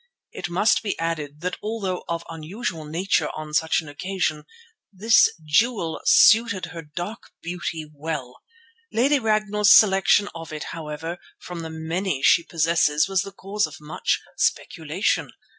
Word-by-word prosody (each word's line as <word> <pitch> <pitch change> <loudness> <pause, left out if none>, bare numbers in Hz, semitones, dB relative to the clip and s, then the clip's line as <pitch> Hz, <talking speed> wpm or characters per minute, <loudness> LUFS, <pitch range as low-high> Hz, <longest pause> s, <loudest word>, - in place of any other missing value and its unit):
It - - -6
must 185 +5 +2
be 205 - -3
added 155 -3 -4
that 180 +1 -3
although 210 -4 -3
of 170 0 -2
an 165 -1 -8
unusual 165 -1 -5
nature 170 +6 0
on 155 -1 -7
such 160 +2 +2
an 160 - -13
occasion 155 0 -3 0.5
this 215 +4 +5 0.2
jewel 165 0 +1
suited 220 -5 +5
her 165 - -6
dark 175 +8 -7
beauty 170 -2 -4
well. 145 -4 -6 0.5
Lady 275 +5 +3
Ragnall's 215 -2 +2
selection 200 0 +6
of 165 -2 -9
it, 155 -1 -5
however, 165 +2 -6 0.2
from 180 -1 -8
the 165 -1 -6
many 160 -1 -3
she 170 - +6
possesses 160 -2 +2
was 195 -1 +1
the 200 0 -7
cause 195 0 -2
of 155 - -11
much 150 +1 -1 0.2
speculation. - - -1
170 Hz, 145 wpm, -23 LUFS, 155-200 Hz, 0.5 s, selection